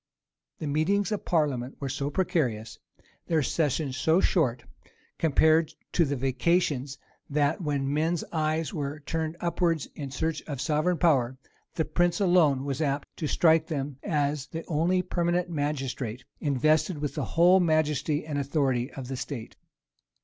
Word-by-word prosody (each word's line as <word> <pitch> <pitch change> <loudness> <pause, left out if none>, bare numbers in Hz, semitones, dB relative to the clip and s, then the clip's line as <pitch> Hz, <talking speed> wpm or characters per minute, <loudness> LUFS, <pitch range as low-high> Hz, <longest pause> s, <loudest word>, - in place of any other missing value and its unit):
The - - -5
meetings 185 +9 +1
of 210 - -3
parliament 140 -6 0
were 140 - -3
so 140 +2 -2
precarious, 135 - -1 0.5
their 160 -3 +2
sessions 145 -1 0
so 160 +5 +3
short, 130 -11 +1 0.6
compared 160 0 +3 0.2
to 170 - +3
the 140 0 -1
vacations, 135 +1 0 0.3
that, 145 +3 +1
when 140 -3 -1
men's 160 +3 0
eyes 155 -2 -1
were 145 0 -4
turned 160 +2 -3
upwards 170 -3 0
in 140 -3 -6
search 160 +3 -2
of 145 -4 -4
sovereign 155 +4 +1
power, 130 -7 +2 0.4
the 160 - 0
prince 175 -1 +1
alone 165 -8 +3
was 140 +1 -2
apt 140 -1 -2
to 155 - -2
strike 160 +1 +3
them 140 -4 -3
as 145 -2 -1
the 165 +1 -6
only 175 +4 +1
permanent 175 0 0
magistrate, 135 -5 -3 0.2
invested 155 +4 +2
with 145 -1 -3
the - - -2
whole 180 +3 +7
majesty 155 -3 +1
and 150 -2 -2
authority 135 -3 0
of 130 -2 -7
the 135 - -4
state. 125 -3 -6
150 Hz, 150 wpm, -27 LUFS, 140-165 Hz, 0.6 s, whole